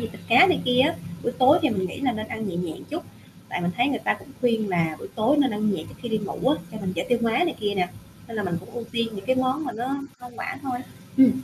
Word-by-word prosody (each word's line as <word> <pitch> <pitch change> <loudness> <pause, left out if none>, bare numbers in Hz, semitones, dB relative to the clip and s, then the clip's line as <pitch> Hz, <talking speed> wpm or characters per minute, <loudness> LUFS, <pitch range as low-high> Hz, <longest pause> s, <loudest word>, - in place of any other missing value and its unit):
gì, - - -2
thịt - - -11
cá 375 - +8
này 360 -4 +3
kia 250 0 +4
á, 285 +5 +4 0.3
buổi 240 - 0
tối 270 +5 +7
thì 305 - +4
mình 190 -4 0
nghĩ - - -7
là 260 -3 +2
nên 215 -1 -4
ăn 220 -2 -3
nhẹ 175 - -3
nhẹ 175 -2 -2 0.2
chút, 325 +3 -3 0.5
tại - - -2
mình 175 0 0
thấy 245 +3 +3
người 260 -5 0
ta - - +1
cũng - - -14
khuyên 225 -4 +2
là 165 -4 +1
buổi - - -8
tối 225 +7 +3
nên 275 -3 +4
ăn 210 -1 +1
nhẹ - - -3
trước - - -12
khi 240 - -3
đi 220 -1 +1
ngủ 210 +5 -1
á, 295 - +4 0.2
cho 215 - -5
mình 185 -2 -2
dễ 170 - -2
tiêu 245 -1 +3
hóa 230 -1 +2
này 335 +7 +2
kia 205 -1 0
nè, 180 -1 +2 0.4
nên 230 - -6
là 210 - 0
mình 175 -3 -1
cũng 185 - -13
ưu 240 -1 -5
tiên 230 -1 +1
những 195 -2 -7
cái 260 - +3
món 260 +4 +1
mà 250 - -3
nó 250 +5 -2 0.2
hoa 245 - -9
quả - - -4
thôi. 255 -3 -2 0.4
Ừm. 265 -2 +8
230 Hz, 305 wpm, -25 LUFS, 205-260 Hz, 0.5 s, cá